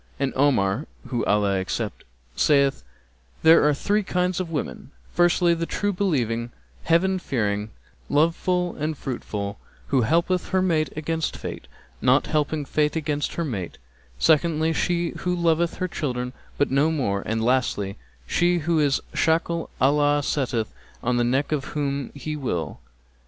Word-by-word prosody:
And 140 - 0
Omar 130 -3 +2 0.2
(whom 120 -3 -1
Allah 100 -2 +2
accept!) 105 +3 -4 0.3
saith, 140 -2 +3 0.6
'There 160 +1 +7
are - - +3
three 205 +8 +1
kinds 180 -2 0
of 180 -3 -3
women, 155 -3 -4 0.2
firstly 175 0 +4
the 165 0 -2
true 205 0 -1
believing, 120 - 0 0.4
Heaven 185 +3 +3
fearing, 105 - -1 0.4
love 160 +3 +3
full 180 -1 -1
and 155 0 -2
fruit 130 -3 -5
full, 100 0 -4 0.3
who 135 -2 +3
helpeth 170 +8 +1
her 190 -1 +2
mate 160 -4 +1
against 160 +1 -2
fate, - - -7 0.3
not - - +4
helping 150 -1 0
fate 150 +2 +1
against 150 -2 -2
her 170 - -1
mate; 100 - -4 0.4
secondly, 160 - +3
she 175 0 0
who 180 0 0
loveth 170 -1 +1
her 185 - -2
children 125 -7 -3 0.2
but 145 - +1
no 140 +4 +3
more 115 -11 0
and, 110 0 -1
lastly, 115 -5 +1 0.3
she 175 - +2
who 165 0 +1
is 145 -2 +2
a - - -8
shackle 165 +1 +1
Allah 145 +1 +3
setteth 120 -6 -1 0.3
on 125 0 +1
the 120 - +2
neck 130 +5 +1
of 150 -3 0
whom 140 -2 -1
He 155 +2 -4
will.' 120 - -3
150 Hz, 155 wpm, -24 LUFS, 125-170 Hz, 0.6 s, There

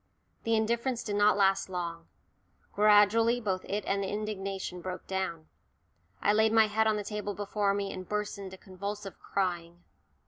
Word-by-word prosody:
The 230 0 +3
indifference 235 +3 0
did 205 - -3
not 205 0 +4
last 195 -1 +3
long. 170 -2 -4 0.7
Gradually 215 +3 +5
both 190 -5 -2
it 205 +1 -2
and 200 0 0
the 195 - -2
indignation 195 -3 -4
broke 185 +1 -6
down. 190 -4 -3 0.8
I 205 - +4
laid 220 +1 +4
my 225 -1 +6
head 220 +1 +1
on 215 - +3
the 210 - -3
table 205 0 -4
before 205 -1 0
me 200 -1 -2
and 185 -1 -8
burst 210 -1 -2
into 190 -1 -8
convulsive 200 +1 -7
crying. 175 -2 -3
205 Hz, 165 wpm, -30 LUFS, 190-210 Hz, 0.8 s, my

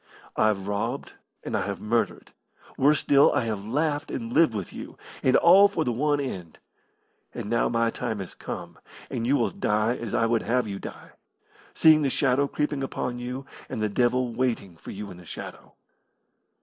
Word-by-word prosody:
I've 105 -3 +1
robbed 100 0 -3 0.3
and - - -3
I - - +1
have - - -3
murdered 115 +2 -1 0.4
worse 145 +3 +3
still, 140 0 +5
I - - +2
have 110 -3 -3
laughed 145 +6 -1
and 115 -1 -4
lived 155 -7 +4
with 100 -4 -5
you - - -9 0.2
and 130 - +3
all 190 +4 +7
for 200 -5 -1
the 125 - 0
one 145 +5 +1
end. 95 - -5 0.8
And 105 - -5
now 115 - +2
my 115 0 +1
time 115 -3 -3
has 95 -3 -6
come, - - -7 0.3
and 115 - -2
you 140 - +4
will - - +1
die 110 - +1
as 115 -4 -4
I 115 - +3
would 115 0 +2
have 125 -1 0
you 100 -1 -5
die, - - -9 0.6
seeing 155 -1 +6
the 140 - +2
shadow 135 +1 +2
creeping 150 -1 -2
upon 125 -2 -3
you 125 +2 -5 0.2
and - - -4
the 110 0 0
devil 120 +2 +1
waiting 115 -7 -1
for 80 - -12
you 105 +1 -6
in 90 - -11
the 90 - -13
shadow." - - -9
120 Hz, 190 wpm, -26 LUFS, 110-140 Hz, 0.8 s, all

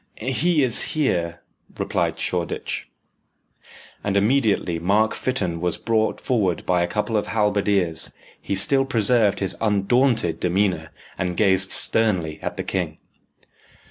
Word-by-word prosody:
"He 150 +6 +1
is 125 -2 +3 0.2
here," 85 - 0 0.4
replied - - -1
Shoreditch. - - -3 1.1
And 100 -1 0
immediately 105 -6 +1
Mark 105 +6 +2
Fytton 90 -10 -2
was 90 -1 -1
brought 110 -1 0
forward 100 -9 -1
by 90 -1 +2
a 85 - +1
couple 105 +5 -2
of 105 - 0
halberdiers. 100 -5 +1 0.3
He 100 - -2
still 135 +8 +3
preserved 115 -5 +2
his 95 - 0
undaunted 110 -3 +1
demeanour, 90 -3 0 0.3
and 90 -1 -2
gazed 95 -2 +3
sternly 95 -9 +2
at - - -5
the - - -3
king. - - -3
100 Hz, 125 wpm, -22 LUFS, 90-115 Hz, 1.1 s, is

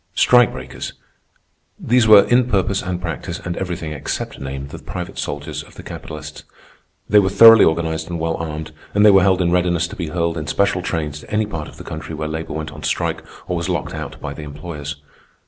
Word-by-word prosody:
Strike 125 -2 +5
breakers—these 110 - -4
were, 105 -2 +9
in 125 +3 +3
purpose 100 -2 +1
and 90 -1 -3
practice 85 0 -4
and 90 0 -5
everything 90 -4 -4
except 75 - -4
name, 70 +1 -6
the - - -8
private - - -6
soldiers - - -4
of - - -16
the - - -10
capitalists. - - -8 0.6
They 105 - +6
were 95 -2 +2
thoroughly 115 +1 +9
organized 80 0 0
and 85 -1 -3
well 80 0 0
armed, 80 -1 -5 0.2
and 105 +1 +5
they 105 - +9
were 95 -1 +6
held 95 -1 +3
in 85 - +1
readiness 90 -1 +2
to - - -8
be 85 - -4
hurled 85 +1 -1
in 75 - -6
special 100 -2 +1
trains 75 -4 -3
to - - -14
any 105 +1 +1
part 80 -7 -5
of - - -13
the - - -9
country 80 - -6
where 75 0 -3
labor 80 +1 -4
went 80 0 -4
on 75 +1 -10
strike 75 - -1 0.3
or 90 - -1
was 85 +2 -2
locked 85 -4 -2
out - - -6
by 70 - -5
the 75 - -9
employers. 75 0 -7
85 Hz, 210 wpm, -20 LUFS, 75-95 Hz, 0.6 s, were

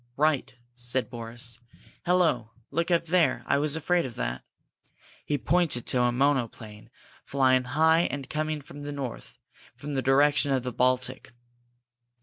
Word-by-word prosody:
"Right!" 150 -4 +1 0.2
said 125 +1 -1
Boris. 120 0 -6 0.5
"Hello 170 -11 +2 0.2
look 170 +4 -1
up 170 -1 +2
there! 175 0 +2
I 140 - +2
was 150 0 +1
afraid 175 +2 +1
of 125 -5 -6
that!" 60 +1 -3 0.8
He 145 - +1
pointed 150 -1 +1
to 125 - +1
a 120 0 +3
monoplane, 120 -5 -1 0.3
flying 130 -2 +2
high 160 +6 +3
and 135 -1 -4
coming 155 0 -2
from 145 +1 -11
the 145 0 -5
north, 135 -4 -6 0.4
from 145 0 -6
the 135 - 0
direction 145 +2 +3
of 130 -2 0
the 125 -1 -4
Baltic. 130 +1 0
135 Hz, 145 wpm, -27 LUFS, 125-155 Hz, 0.8 s, a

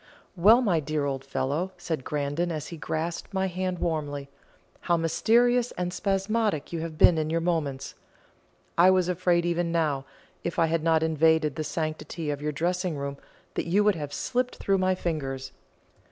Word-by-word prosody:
"Well, 215 +8 +6
my 180 -8 +2
dear 150 -1 -2
old 135 -1 -2
fellow," 145 +7 -2
said 160 -6 -3
Grandon, 150 +5 -1
as 155 -3 -4
he 170 - -6
grasped 165 +4 -4
my 190 0 +1
hand 185 0 -2
warmly, 145 -4 -2 0.5
"how 170 -1 +1
mysterious 240 +9 +3
and 180 0 -3
spasmodic 195 -2 0
you 165 - -2
have 160 -1 -5
been 165 0 +6
in 155 0 -1
your 165 +1 +1
movements! 160 -6 -2 0.9
I 180 +2 +8
was 185 -2 +3
afraid 175 -1 +1
even 175 0 0
now, 150 -5 0 0.4
if 170 - -3
I 165 - +4
had 165 0 0
not 160 -1 +3
invaded 160 -2 +3
the 155 - -2
sanctity 155 +1 -3
of 145 -1 -4
your 150 0 -1
dressing 175 +2 -1
room, 140 0 -4 0.4
that - - -2
you 195 +5 +3
would 210 0 +4
have 150 -4 -5
slipped 250 - -1
through 195 -1 +1
my 185 0 +2
fingers. 135 -7 -3
165 Hz, 175 wpm, -27 LUFS, 150-180 Hz, 0.9 s, I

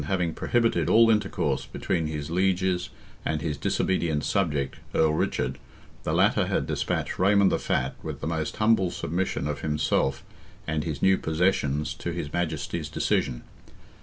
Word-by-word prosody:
having 90 -3 0
prohibited 115 -9 +1
all 115 +3 +6
intercourse 105 -3 0
between 80 -3 -1
his 75 0 -4
lieges 90 -1 +1 0.3
and 80 -1 -1
his 75 -3 -1
disobedient 80 +1 0
subject, 75 -9 0 0.2
Earl 80 -1 +4
Richard, 65 -4 -1 0.4
the - - -2
latter - - +3
had - - 0
despatched - - -2
Raymond 100 +1 +4
the - - +1
Fat, 65 +1 0
with - - -6
the - - -5
most 80 -1 -2
humble 110 -4 +3
submission 85 +1 -2
of 70 -2 -3
himself 75 -3 0 0.4
and 80 -2 -1
his 75 -4 -4
new 95 0 +5
possessions 80 -3 0
to 85 - -5
his 85 -3 -4
Majesty's 80 -4 -2
decision. - - 0
85 Hz, 150 wpm, -26 LUFS, 75-95 Hz, 0.4 s, all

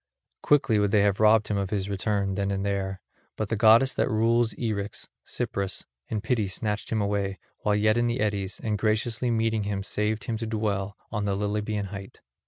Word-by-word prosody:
Quickly 135 -7 +3
would 105 0 +2
they 100 +1 +4
have 100 -1 +2
robbed 110 0 +5
him 105 - 0
of 100 -1 -1
his 100 -2 -1
return 100 0 -1
then 100 0 -1
and 100 0 -1
there, 95 -1 -2 0.4
but 110 -2 -2
the 110 - +1
goddess 115 +5 +6
that - - +1
rules 115 +1 +2
Eryx, 105 -3 -3 0.2
Cypris, 100 -1 -2 0.2
in 110 -2 -2
pity 110 -2 0
snatched 105 +2 -3
him 110 -2 +1
away, 100 -1 -1 0.2
while 105 -1 +1
yet 110 +2 +3
in 120 0 +2
the 120 +2 -1
eddies, 100 -3 -1
and 105 -2 -1
graciously 110 +3 +1
meeting 115 -1 +1
him 100 -1 -2
saved 105 +2 -1
him 115 - -2
to 115 0 -4
dwell 100 -3 -2
on 105 -2 -1
the 100 -1 0
Lilybean 105 0 -2
height. 100 -1 -9
105 Hz, 195 wpm, -27 LUFS, 100-110 Hz, 0.4 s, goddess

